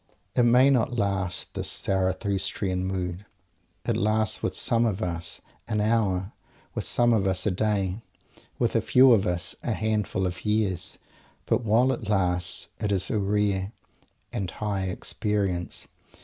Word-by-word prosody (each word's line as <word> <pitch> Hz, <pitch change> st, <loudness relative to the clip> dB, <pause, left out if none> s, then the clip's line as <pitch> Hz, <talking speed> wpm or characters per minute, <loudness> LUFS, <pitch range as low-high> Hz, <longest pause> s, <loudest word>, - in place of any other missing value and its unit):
It -, -, +4 dB
may 125 Hz, +3 st, +5 dB
not 125 Hz, -1 st, +1 dB
last, 95 Hz, -4 st, -2 dB
this -, -, -2 dB
Zarathustrian 95 Hz, 0 st, -1 dB
mood. 90 Hz, 0 st, -3 dB, 0.6 s
It -, -, +1 dB
lasts 110 Hz, 0 st, +1 dB
with -, -, -2 dB
some 115 Hz, 0 st, +2 dB
of 110 Hz, -4 st, 0 dB
us 85 Hz, -1 st, -3 dB, 0.3 s
an 110 Hz, -2 st, -1 dB
hour; 105 Hz, -3 st, +1 dB, 0.4 s
with -, -, -3 dB
some 120 Hz, 0 st, +4 dB
of 100 Hz, -4 st, +2 dB
us 95 Hz, -1 st, +2 dB
a 105 Hz, -, +2 dB
day 100 Hz, 0 st, 0 dB, 0.6 s
with -, -, 0 dB
a -, -, +4 dB
few 130 Hz, 0 st, +6 dB
of 105 Hz, -3 st, +4 dB
us 90 Hz, -2 st, -1 dB
a -, -, -1 dB
handful 105 Hz, -3 st, -1 dB
of 90 Hz, 0 st, -4 dB
years! 105 Hz, -4 st, 0 dB, 0.5 s
But 120 Hz, -, +1 dB
while 115 Hz, +4 st, +3 dB
it 110 Hz, -5 st, -4 dB
lasts, 90 Hz, -3 st, 0 dB
it 105 Hz, -1 st, -1 dB
is 95 Hz, -1 st, 0 dB
a 105 Hz, -, +1 dB
rare 100 Hz, 0 st, 0 dB, 0.6 s
and 100 Hz, -6 st, -2 dB
high 100 Hz, 0 st, -2 dB
experience. 95 Hz, -1 st, -1 dB
100 Hz, 150 wpm, -26 LUFS, 95-110 Hz, 0.6 s, few